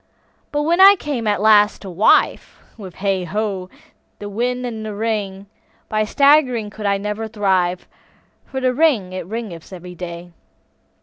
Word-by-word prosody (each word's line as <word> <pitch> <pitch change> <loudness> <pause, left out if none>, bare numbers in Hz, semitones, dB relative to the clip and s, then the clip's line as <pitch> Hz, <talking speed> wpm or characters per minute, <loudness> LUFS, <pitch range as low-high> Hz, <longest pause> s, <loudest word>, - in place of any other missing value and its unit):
But 295 0 -1
when 340 +4 +2
I 395 +1 +9
came, 280 - -4
alas! 210 0 +4
to 200 - -11
wive, 185 +5 +2 0.2
With 190 -6 -11
hey, 195 -2 -1
ho, 195 0 -3 0.5
the 205 - -7
wind 245 +4 -2
and 225 -3 -5
the 215 -1 -6
rain, 205 -3 -3 0.4
By 215 0 0
swaggering 260 -4 +3
could 210 0 -5
I 200 0 +2
never 210 +2 -4
thrive, 190 -5 0 0.6
For 265 - -4
the 255 -1 +1
rain 250 - +1
it 185 -1 -6
raineth 210 -8 -7
every 180 -1 -9
day. 175 0 -8
210 Hz, 150 wpm, -19 LUFS, 190-240 Hz, 0.6 s, I